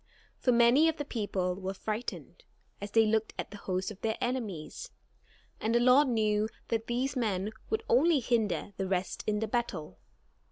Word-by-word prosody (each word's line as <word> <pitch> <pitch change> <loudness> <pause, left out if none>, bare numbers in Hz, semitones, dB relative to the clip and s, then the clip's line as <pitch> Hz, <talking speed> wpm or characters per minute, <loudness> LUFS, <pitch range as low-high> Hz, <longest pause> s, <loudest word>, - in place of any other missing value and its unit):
For 250 - +3
many 240 +7 +5
of 320 - -3
the 290 - -3
people 200 -7 -1
were 190 +1 -3
frightened, 220 - -5 0.4
as 205 - -4
they 225 +2 +4
looked 220 0 0
at - - -5
the 205 - -8
host 185 0 -2
of 205 - -12
their 220 -1 -1
enemies, 225 -11 -3 0.7
and 225 +2 0
the - - +5
Lord 255 +4 +6
knew 215 -2 +1 0.2
that 225 0 -1
these 255 +4 -1
men 210 -4 -1 0.2
would 440 - -1
only 300 +5 +4
hinder 220 -5 0
the 195 - -2
rest 185 -1 -2
in 210 0 0
the 220 - 0
battle. 190 - -3
220 Hz, 175 wpm, -30 LUFS, 200-245 Hz, 0.7 s, Lord